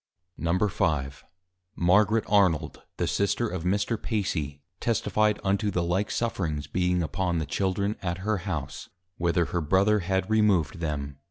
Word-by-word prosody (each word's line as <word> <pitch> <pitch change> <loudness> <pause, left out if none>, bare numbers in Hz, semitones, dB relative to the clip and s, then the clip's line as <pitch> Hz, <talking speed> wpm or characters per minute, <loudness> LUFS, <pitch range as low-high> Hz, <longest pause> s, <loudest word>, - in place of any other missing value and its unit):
_ 85 -6 +1
V. - - -19 0.5
Margaret 105 +5 +3
Arnold, 90 -7 +2 0.2
the - - 0
Sister 100 +4 0
of 90 -5 -4
Mr. 100 +4 0
Pacy, 80 - -2 0.2
Testifi'd 110 -2 +1
unto 100 +2 +1
the 90 -3 0
like 90 +4 0
Sufferings 85 -11 -2
being 90 -1 0
upon 85 +3 -1
the 80 - -1
Children, 100 +7 -1
at 85 -2 -2
her 110 -1 +1
House, 90 - -5 0.3
whither 85 0 +1
her 85 - -2
Brother 95 +7 +3
had 95 +1 -1
Removed 100 -6 +2
them. 70 -4 -3
95 Hz, 145 wpm, -27 LUFS, 85-105 Hz, 0.5 s, Margaret